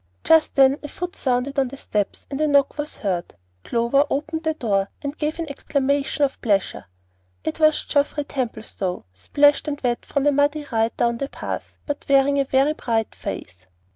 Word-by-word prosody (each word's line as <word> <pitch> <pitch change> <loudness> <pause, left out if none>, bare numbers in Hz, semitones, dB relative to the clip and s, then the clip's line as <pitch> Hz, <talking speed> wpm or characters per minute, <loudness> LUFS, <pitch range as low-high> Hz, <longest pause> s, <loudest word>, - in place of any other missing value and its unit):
Just 320 -1 +4
then 270 +1 +5
a 295 - -6
foot 355 +4 -6
sounded 260 +2 0
on 265 - +2
the 275 +2 -9
steps, 205 -6 -2
and 275 +2 -2
a 310 - +3
knock 280 0 +3
was 295 +1 -4
heard. 180 -4 -3 0.3
Clover 235 +4 +2
opened 315 +3 -2
the 315 -1 -1
door, 200 -7 0
and 285 +1 -3
gave 305 +1 -2
an 330 -1 -3
exclamation 280 0 0
of 275 - 0
pleasure. 200 - 0 0.6
It 155 - -3
was 310 -1 +4
Geoffrey 290 0 +1
Templestowe, 220 -9 -4
splashed 290 - +3
and 290 -1 -2
wet 240 -2 0
from 280 0 -1
a 290 - +5
muddy 290 +1 +1
ride 225 0 0
down 235 0 +1
the 275 - -3
pass, - - -6
but 290 -1 -4
wearing 280 +1 +4
a 275 - +2
very 270 +3 +3
bright 225 -6 -1
face. 90 +1 -7
275 Hz, 185 wpm, -23 LUFS, 235-290 Hz, 0.6 s, then